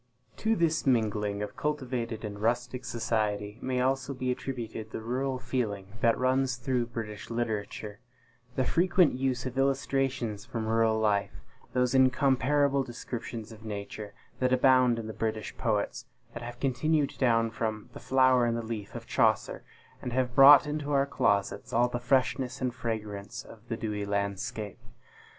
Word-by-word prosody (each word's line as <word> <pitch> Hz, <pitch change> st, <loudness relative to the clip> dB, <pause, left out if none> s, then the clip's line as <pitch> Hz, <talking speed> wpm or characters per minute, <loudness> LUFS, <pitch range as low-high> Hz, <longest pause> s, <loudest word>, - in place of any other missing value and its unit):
To 220 Hz, +1 st, +1 dB
this 165 Hz, -5 st, +1 dB
mingling 105 Hz, -4 st, +1 dB
of 105 Hz, 0 st, -6 dB
cultivated 125 Hz, -7 st, -3 dB
and 100 Hz, -1 st, -6 dB
rustic 125 Hz, +3 st, -1 dB
society 110 Hz, -3 st, -1 dB
may 130 Hz, -1 st, -1 dB
also 135 Hz, +1 st, 0 dB
be 130 Hz, 0 st, -1 dB
attributed 115 Hz, -4 st, -5 dB
the -, -, -5 dB
rural 130 Hz, +4 st, -2 dB
feeling 115 Hz, -7 st, -3 dB
that 115 Hz, -1 st, +3 dB
runs 130 Hz, 0 st, +1 dB
through 125 Hz, -1 st, -1 dB
British 110 Hz, -3 st, -6 dB
literature; 110 Hz, -2 st, -3 dB, 0.6 s
the 130 Hz, -, +1 dB
frequent 175 Hz, +1 st, +3 dB
use 130 Hz, -1 st, -1 dB
of 130 Hz, +1 st, -3 dB
illustrations 135 Hz, -5 st, 0 dB
from 115 Hz, -2 st, -4 dB
rural 110 Hz, 0 st, +2 dB
life; 105 Hz, -2 st, 0 dB, 0.3 s
those 125 Hz, 0 st, +2 dB
incomparable 135 Hz, +2 st, +3 dB
descriptions 120 Hz, -2 st, -6 dB
of 110 Hz, 0 st, -12 dB
Nature, 105 Hz, 0 st, -6 dB, 0.2 s
that 130 Hz, -1 st, +2 dB
abound 130 Hz, -2 st, +5 dB
in 115 Hz, -, -4 dB
the 110 Hz, -, -5 dB
British 110 Hz, -1 st, -3 dB
poets 110 Hz, -4 st, -1 dB, 0.3 s
that 120 Hz, -, -7 dB
have 120 Hz, 0 st, -7 dB
continued 140 Hz, +3 st, +1 dB
down 115 Hz, -3 st, +3 dB
from 110 Hz, -2 st, -3 dB
"The -, -, -8 dB
Flower 130 Hz, -2 st, +4 dB
and 115 Hz, 0 st, 0 dB
the 115 Hz, -, -3 dB
Leaf," 110 Hz, -3 st, -6 dB
of -, -, -6 dB
Chaucer, -, -, +1 dB, 0.4 s
and 125 Hz, -, -4 dB
have 125 Hz, -1 st, 0 dB
brought 140 Hz, +3 st, +9 dB
into 150 Hz, -1 st, -3 dB
our 140 Hz, -1 st, +3 dB
closets 100 Hz, -7 st, 0 dB
all 120 Hz, +1 st, +3 dB
the 120 Hz, -, -3 dB
freshness 130 Hz, +1 st, +1 dB
and 125 Hz, -2 st, -1 dB
fragrance 110 Hz, -2 st, -5 dB
of 115 Hz, -, -13 dB
the 115 Hz, -, -3 dB
dewy 105 Hz, -3 st, -3 dB
landscape. 100 Hz, +2 st, -3 dB
120 Hz, 155 wpm, -29 LUFS, 110-130 Hz, 0.6 s, brought